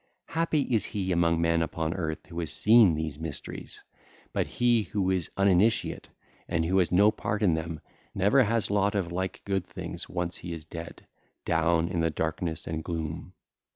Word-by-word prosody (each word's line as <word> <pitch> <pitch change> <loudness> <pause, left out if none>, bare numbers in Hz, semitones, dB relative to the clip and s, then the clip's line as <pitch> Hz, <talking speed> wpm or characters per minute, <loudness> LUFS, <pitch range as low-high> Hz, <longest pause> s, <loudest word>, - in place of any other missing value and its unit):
Happy 165 -2 +1
is 115 -5 +1
he 95 -4 -2
among 85 -1 +2
men 85 0 +2
upon 80 0 -1
earth 80 -4 -4
who 85 -1 -7
has 80 -4 -3
seen 110 -6 +5
these 80 -2 -4
mysteries; 80 -3 -7 0.5
but - - 0
he 120 -2 +2
who 100 -3 -1
is 90 -4 0
uninitiate 100 +3 +2 0.4
and 85 -2 +1
who 95 +3 +2
has 90 - +2
no 100 +4 +6
part 105 0 -2
in 90 -5 +4
them, 80 0 -3 0.4
never 105 +9 +4
has 115 -3 +1
lot 100 0 +2
of 90 -4 -1
like 95 +1 -3
good 95 -2 0
things - - -7
once 90 -1 -3
he 85 - -6
is 80 -2 -8
dead, 85 +1 -9 0.4
down 80 0 +2
in 90 -1 -2
the 80 0 +2
darkness 80 +1 -2
and 80 -1 -4
gloom. 80 +2 -4
85 Hz, 180 wpm, -28 LUFS, 80-100 Hz, 0.5 s, no